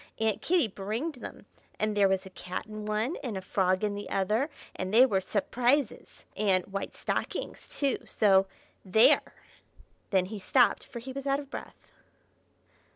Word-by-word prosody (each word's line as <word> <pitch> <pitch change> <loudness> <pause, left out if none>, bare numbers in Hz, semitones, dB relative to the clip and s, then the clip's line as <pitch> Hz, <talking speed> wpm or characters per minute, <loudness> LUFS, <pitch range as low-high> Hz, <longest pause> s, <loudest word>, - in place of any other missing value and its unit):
Aunt 220 -2 0
Kitty 345 -7 +3
bringed 225 - -4
them, - - -9 0.3
and 215 0 0
there 200 -1 +5
was 190 0 0
a 190 - -10
cat 185 +3 -5
in 215 -1 -7
one, 215 +8 -1
and 230 -7 -3
a - - -4
frog 185 +1 +1
in 210 -1 +1
the 205 0 -6
other, 215 - +1 0.3
and 185 0 -3
they 240 +4 +8
were 200 -7 +1
s'prises. 240 +6 0
And 190 -3 +2
white 195 0 -5
stockings - - -4
too, 280 -2 +1
so 195 -2 +4 0.4
there!" 210 +4 +4 0.7
Then 190 -2 +3
he 205 +2 -6
stopped, 245 +5 +3
for 240 - -9
he 260 +3 -7
was 275 +1 -5
out 275 0 +2
of 280 -1 -10
breath. - - -9
215 Hz, 165 wpm, -29 LUFS, 195-250 Hz, 0.7 s, they